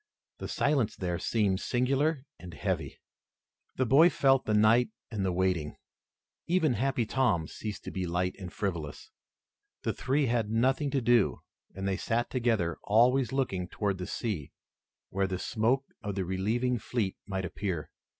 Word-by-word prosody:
The - - -5
silence 140 -6 +1
there 90 -2 -2
seemed 100 -4 +1
singular 135 +5 +1
and 85 0 -10
heavy. - - -3 0.8
The 130 - +1
boy 145 +8 +7
felt 135 -5 +3
the 110 - 0
night 110 +3 +5 0.2
and 105 -3 -2
the 95 - +1
waiting. 90 -4 0 0.7
Even 165 -6 +3
Happy 130 +1 0
Tom 105 -10 +1
ceased 105 -2 -6
to - - -6
be 95 -1 -3
light 90 +2 -1
and 90 -2 -7
frivolous. 85 -8 -4 0.7
The - - 0
three 140 +2 +1
had 115 -3 0
nothing 130 +6 +2
to 135 -1 0
do 120 -2 +3 0.3
and 95 +1 -3
they 95 -1 0
sat 115 +3 -1
together, 115 -10 +1
always 125 +4 +3
looking 95 -10 -1
toward 100 0 -2
the 90 - -4
sea 100 - -3 0.6
where 95 0 +1
the 95 -1 -2
smoke 120 +7 +1 0.2
of 100 -2 -4
the 95 -2 -1
relieving 115 +7 0
fleet 110 -3 -2
might 95 -2 -2
appear. 85 -4 -4
110 Hz, 160 wpm, -30 LUFS, 95-125 Hz, 0.8 s, boy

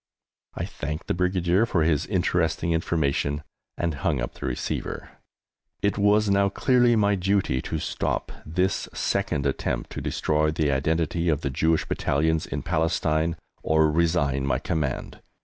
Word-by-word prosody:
I - - -2
thanked 75 +2 -5
the - - 0
Brigadier 90 +3 +2
for 80 -7 +1
his 80 0 +1
interesting 85 -3 0
information 75 -3 0 0.3
and 85 -2 -1
hung 75 -4 +1
up - - -3
the - - -6
receiver. 60 - -4 0.7
It 100 +1 +1
was 105 +1 +4
now 100 0 +3
clearly 120 +3 +3
my 100 -2 +3
duty 95 -8 +1
to 80 - -3
stop - - -2
this 90 +4 -1
second 70 - 0
attempt 65 -3 -2
to - - -5
destroy 75 0 +1
the 75 -2 +1
identity 80 +4 0
of 75 -1 +1
the 70 - -2
Jewish 80 +4 +1
Battalions 80 +2 0
in - - -4
Palestine 80 0 0 0.2
or 80 -1 +3
resign 75 -4 +1
my 70 - +1
command. 75 -6 -3
80 Hz, 150 wpm, -25 LUFS, 75-90 Hz, 0.7 s, was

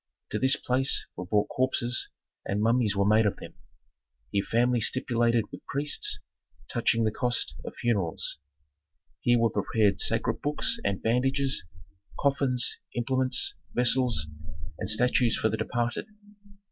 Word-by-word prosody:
To - - -1
this 130 0 +4
place 130 +2 0
were 90 - -6
brought 105 +1 +1
corpses, 125 -2 0 0.3
and 100 - -2
mummies 115 -1 +2
were 100 0 +2
made 110 +1 +4
of 100 - -1
them; - - -11 0.8
here 100 -1 +1
families 120 0 +2
stipulated 120 -3 +1
with - - -10
priests, 145 +2 -1 0.5
touching 115 -1 +1
the 110 - +1
cost 120 +1 0
of - - -8
funerals. 100 -11 -1 0.8
Here 120 0 +3
were 115 -1 +2
prepared 105 -3 +1
sacred - - 0
books 150 +10 -1
and 100 - -2
bandages, 135 0 +1 0.6
coffins, 135 -3 +2 0.2
implements, 130 +2 +1 0.2
vessels, 120 -7 +3 0.5
and - - -2
statues 120 +1 +3
for 110 - +1
the 110 - -2
departed. 120 - -2
120 Hz, 135 wpm, -27 LUFS, 110-130 Hz, 0.8 s, this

